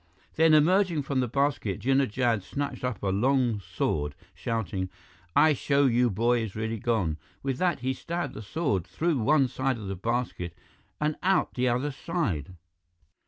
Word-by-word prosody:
Then, 160 -1 +5
emerging 170 0 +3
from 135 -1 -1
the 125 - +1
basket, 130 -6 0
Jinnah 135 +2 +2
Jad 115 -1 +1
snatched 140 +10 -4
up 125 -6 -3
a 100 - +1
long 120 +2 +2
sword, 80 -6 -2 0.2
shouting, 100 -5 -3 0.5
"I 155 -1 +6
show 140 0 +2
you 125 -1 +3
boy 120 +4 +2
is 110 -4 -5
really 110 +1 -2
gone!" 100 -9 0 0.3
With 135 -2 -2
that, 180 -7 +1
he 130 +1 0
stabbed 170 +7 -4
the 105 - -7
sword 105 - -1
through 165 -4 0
one 140 +3 +4
side 130 +1 -1
of 105 - -7
the 95 0 -3
basket 115 -4 -2 0.4
and 150 0 0
out 190 0 +2
the 125 0 +1
other 125 +5 0
side. 110 - -3
125 Hz, 165 wpm, -27 LUFS, 105-145 Hz, 0.5 s, I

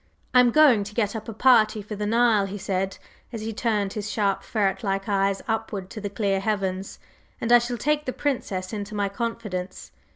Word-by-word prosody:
"I 250 - +7
am 250 -1 +6
going 255 -6 +5
to 205 +1 -10
get 210 -2 0
up 220 +1 -6
a - - -5
party 215 -3 +4
for 210 +1 -6
the 210 0 -3
Nile," 225 -3 +3
he 200 +2 -6
said 190 0 -2 0.3
as 225 -3 -5
he 220 +1 -4
turned 210 -3 -1
his 210 -2 -4
sharp, 200 -3 0
ferret 205 0 -1
like 195 0 -1
eyes 195 -1 +1
upwards 220 -4 -3
to 215 - -7
the 205 - -3
clear 200 -1 0
heavens; 195 -2 -2 0.4
"and 235 - -2
I 240 - +9
shall 240 +1 -3
take 300 +5 0
the 255 - -1
Princess 215 -10 -3
into 210 0 -5
my 200 -1 0
confidence. 200 -4 -5
210 Hz, 205 wpm, -25 LUFS, 195-230 Hz, 0.4 s, I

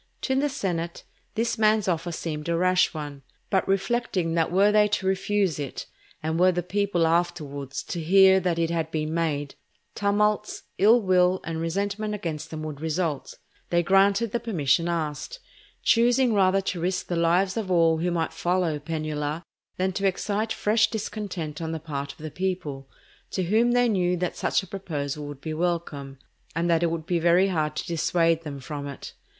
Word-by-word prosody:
To 265 - 0
the 280 +2 +1
senate 170 -9 -3 0.3
this 230 0 -1
man's 215 -1 +3
offer 175 -1 -1
seemed 155 -1 -4
a 170 - +1
rash 185 +1 +3
one; 145 -3 -7 0.3
but 190 - +2
reflecting 195 -3 0
that 165 -1 +1
were 200 +3 +4
they 210 0 +5
to 205 -2 -1
refuse 190 -3 +1
it, 140 -3 -5 0.4
and 160 +1 -1
were 185 +1 +6
the 175 0 -2
people 190 -2 +1
afterwards 155 -5 -1
to 170 - -4
hear 190 +3 +6
that 180 -2 0
it 165 0 0
had 165 -1 -1
been 155 -1 -2
made, 150 -4 -1 0.4
tumults, 210 +1 0 0.2
ill 220 +5 +6
will, 185 -1 +3
and 165 -1 -4
resentment 200 +5 -2
against 160 -5 -5
them 155 -1 -6
would 150 -2 -6
result, 160 -2 -2 0.3
they 175 0 +2
granted 195 +4 +3
the 235 - 0
permission 170 - +1
asked; 165 - -3 0.5
choosing 240 +1 +4
rather 195 -1 +3
to 185 -3 -3
risk 185 +2 -1
the 175 - -3
lives 175 +3 +2
of 220 -4 -3
all 165 -2 +3
who 175 +2 0
might 170 -2 -1
follow 175 -4 0
Penula, 155 0 -3 0.3
than 185 +1 +1
to 195 +1 0
excite 210 +3 -1
fresh 220 +1 +2
discontent 195 -8 -5
on 160 0 -3
the 160 - -3
part 140 -3 -5
of - - -18
the 155 0 -7
people, 150 -6 -3 0.4
to 185 - -2
whom 225 +7 +3
they 245 0 +4
knew 180 -5 +1
that 180 0 -2
such - - 0
a - - -10
proposal 150 -6 -4
would 145 -1 -9
be 155 - -4
welcome, 155 -5 -2 0.4
and 170 +1 0
that 165 0 +3
it 170 - +2
would 165 -1 -4
be 175 0 0
very 175 +3 +4
hard 155 -4 -1
to - - -3
dissuade 165 0 +1
them 145 -4 -7
from 145 +2 -6
it. 140 - -8
175 Hz, 185 wpm, -25 LUFS, 160-195 Hz, 0.5 s, were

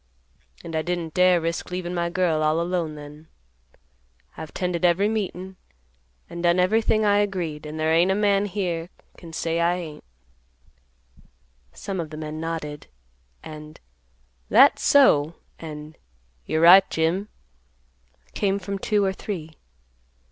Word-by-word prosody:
And 165 -1 -7
I 160 - +1
didn't 170 -1 -3
dare 180 -1 +4
risk 165 +1 -3
leaving 180 -1 -4
my 170 -1 -1
girl 170 -3 0
all 155 +1 +2
alone 170 -2 -2
then. 150 +1 -12 1.1
I've 160 - -8
'tended 180 -1 -3
every 180 +3 +3
meetin', 190 -3 -4 0.7
and 170 - -7
done 175 +1 +3
everything 215 +3 +2
I 205 0 +4
agreed, 175 -7 -3
and 155 +1 -7
there 160 +1 +1
ain't 170 +3 +4
a 190 - +2
man 205 -1 +2
here 175 -4 -3 0.3
can 170 -2 -12
say 165 +1 -2
I 170 +1 +2
ain't." 160 -4 -8 1.7
Some 185 - -5
of 165 -2 -4
the 155 - -9
men 155 0 -6
nodded, 160 -3 -5 0.6
and 155 0 -10 0.7
"That's - - +6
so," 165 - +4 0.2
and 155 -1 -9 0.5
"You're 155 0 0
right, 185 +3 +8
Jim" 170 +6 -1 1.0
came 195 -1 0
from 200 0 -5
two 205 0 +1
or 190 - 0
three. 175 -5 -6
170 Hz, 140 wpm, -24 LUFS, 160-190 Hz, 1.7 s, right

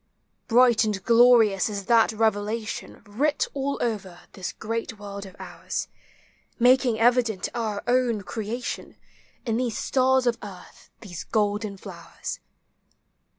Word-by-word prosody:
Bright 240 -1 +5
and 210 -3 -2
glorious 230 -4 +5
is 200 -2 -5
thai 230 +1 +5
revelation, 215 0 -2
Writ 265 +9 0
all 275 0 -2
over 200 -7 -4
this 190 - -5
great 225 0 -4
world 200 -1 -8
of 190 - -14
ours. - - -5 0.7
Making 245 -2 +4
evident 235 -4 +2
our 215 -3 -3
own 240 -3 +1
creation, 225 +5 -5 0.5
In 225 -2 0
these 245 -3 -1
stars 260 -1 +2
of 235 -1 +1
earth, 190 -3 -12
these 175 -6 -7
golden 210 -1 -1
flowers. - - -8
225 Hz, 120 wpm, -25 LUFS, 205-245 Hz, 0.7 s, Bright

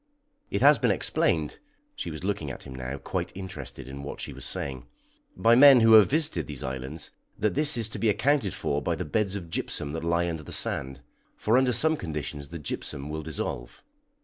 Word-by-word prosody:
It - - -1
has - - +7
been - - +2
explained" - - 0 0.4
she - - -5
was 75 0 -7
looking 95 -7 -2
at 65 - -8
him 65 - -9
now, 65 +1 -5
quite - - -4
interested 95 -7 -7
in 70 +1 -8
what 70 - -7
she - - -5
was - - -8
saying 65 -3 -4 0.5
"by 115 +6 +4
men 135 0 +8
who 115 0 +6
have 110 -3 +8
visited 155 +2 +1
these 75 -4 -7
islands, 65 +4 -5 0.3
that 105 0 0
this 150 -2 +4
is 115 -2 0
to - - -7
be 115 - +2
accounted 110 - +1
for 70 0 -1
by - - -1
the - - -4
beds 100 +4 -1
of 85 -5 -7
gypsum 75 -3 -2
that 80 +1 -5
lie 85 +1 +1
under 80 -2 -3
the 75 - -10
sand, 65 +1 -2 0.3
for 110 - +1
under 130 0 +4
some 160 +7 +4
conditions 75 - -5
the 85 - -7
gypsum 70 -1 -5
will 80 +1 -4
dissolve." 75 -5 -5
85 Hz, 205 wpm, -27 LUFS, 70-110 Hz, 0.5 s, men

